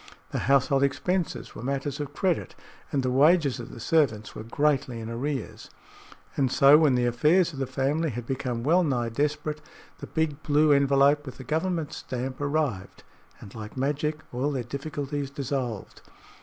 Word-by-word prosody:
The - - -2
household 135 0 +4
expenses 170 +6 -1
were - - -9
matters 135 +2 -3
of 145 0 -5
credit, 185 -4 -1 0.4
and 140 -3 0
the 130 - 0
wages 145 0 +4
of 120 - -7
the - - -10
servants 115 -6 +1
were - - -7
greatly 130 +1 0
in 115 0 -6
arrears. 130 +1 -4 0.7
And 130 -3 +1
so, 140 +2 +7
when 150 -5 +4
the 125 0 +2
affairs 155 +9 +3
of 135 - -7
the 135 - -1
family 140 +5 0
had 120 -1 -5
become 125 -2 -3
well 170 +6 +4
nigh 125 -6 0
desperate, 150 +4 -2 0.4
the - - -7
big 155 -2 -1
blue 150 +1 +3
envelope 140 +1 +4
with 130 -3 -9
the 130 - -8
government 160 +2 -1
stamp 130 +2 -5
arrived, 140 -10 -2 0.4
and 100 - -12
like 110 +1 -8
magic 150 +3 -1
all 130 +4 0
their 130 -3 -2
difficulties 140 +2 -4
dissolved. 130 -6 -4
140 Hz, 170 wpm, -26 LUFS, 125-150 Hz, 0.7 s, so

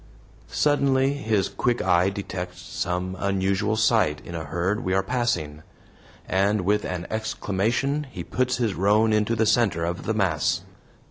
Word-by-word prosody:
Suddenly 140 -2 +2
his 110 -8 0
quick 120 -1 -1
eye 90 0 +3
detects 95 -2 -6
some 90 +1 -3
unusual 100 +2 0
sight 110 -9 +2
in 85 - -8
a 80 -2 -4
herd 90 - -1
we 95 - 0
are 95 - +2
passing, 95 -11 -1 0.7
and 100 +2 +2
with 105 +3 +1
an 90 -1 -4
exclamation 110 +6 -1
he - - -6
puts 130 0 -1
his 115 -5 0
roan 105 +4 +3
into 105 +2 +2
the 110 0 +2
center 105 -8 +2
of 85 +1 -4
the 110 - 0
mass. 90 -2 +1
100 Hz, 150 wpm, -25 LUFS, 90-115 Hz, 0.7 s, eye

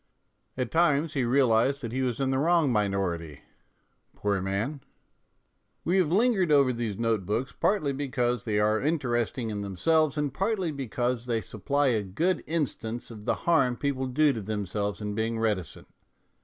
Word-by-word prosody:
At 125 -3 -2
times 160 -2 +2
he 135 - 0
realized 130 +1 +2
that 115 - -4
he 130 +2 -2
was 125 -2 -1
in 135 -1 +1
the 130 - +1
wrong 165 -2 +3
minority, 95 - -1 0.7
poor 100 -2 -1
man! 105 +10 -2 1.0
We 175 +3 +1
have 175 -5 +2
lingered 200 -4 +3
over 140 -3 +5
these 115 -4 -3
note 115 -3 0
books 110 +8 -2
partly 155 -9 +1
because 125 -4 -1
they 105 -2 0
are 105 +1 +2
interesting 120 -6 -1
in 105 -1 -3
them 100 -2 -5
selves 155 - +2
and 145 -3 -1
partly 190 -1 -1
because 125 -2 -2
they 115 -2 +1
supply 135 +8 0
a 110 -4 +1
good 155 - -1
instance 120 -8 -2
of 105 -2 -10
the - - +1
harm 135 -8 +3
people 135 -2 -1
do 145 +4 +3
themselves 105 -1 -3
in 105 0 -3
being 110 +2 -1
reticent. 105 -7 -2
125 Hz, 165 wpm, -27 LUFS, 110-145 Hz, 1.0 s, over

